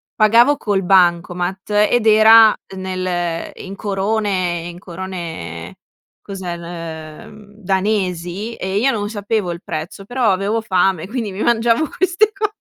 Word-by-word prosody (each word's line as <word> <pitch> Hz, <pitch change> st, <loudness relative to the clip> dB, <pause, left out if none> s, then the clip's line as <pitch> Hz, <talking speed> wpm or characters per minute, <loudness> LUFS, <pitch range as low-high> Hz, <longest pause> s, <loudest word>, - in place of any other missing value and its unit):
pagavo 235 Hz, +6 st, +5 dB
col 200 Hz, -7 st, -1 dB
bancomat 180 Hz, +1 st, +1 dB, 0.2 s
ed 240 Hz, -2 st, +1 dB
era 220 Hz, 0 st, +7 dB, 0.2 s
nel 185 Hz, -3 st, -3 dB
in 195 Hz, +1 st, -9 dB
corone 195 Hz, -4 st, -1 dB
in 175 Hz, -, -10 dB
corone 170 Hz, -, -7 dB, 0.4 s
cos'è, 190 Hz, -3 st, -6 dB
ehm, 170 Hz, +4 st, -9 dB
danesi. 190 Hz, +1 st, -1 dB
E 190 Hz, +1 st, -3 dB
io 260 Hz, +6 st, +3 dB
non 205 Hz, -4 st, -3 dB
sapevo 205 Hz, -3 st, -2 dB
il 170 Hz, +1 st, -7 dB
prezzo, 165 Hz, +5 st, -6 dB
però 245 Hz, -2 st, +1 dB
avevo 200 Hz, +4 st, 0 dB
fame, 185 Hz, -3 st, +1 dB
quindi 225 Hz, -3 st, -4 dB
mi 195 Hz, -, -6 dB
mangiavo 235 Hz, +5 st, +2 dB
queste 375 Hz, +4 st, +2 dB
co 420 Hz, +1 st, -1 dB
195 Hz, 130 wpm, -18 LUFS, 175-220 Hz, 0.4 s, era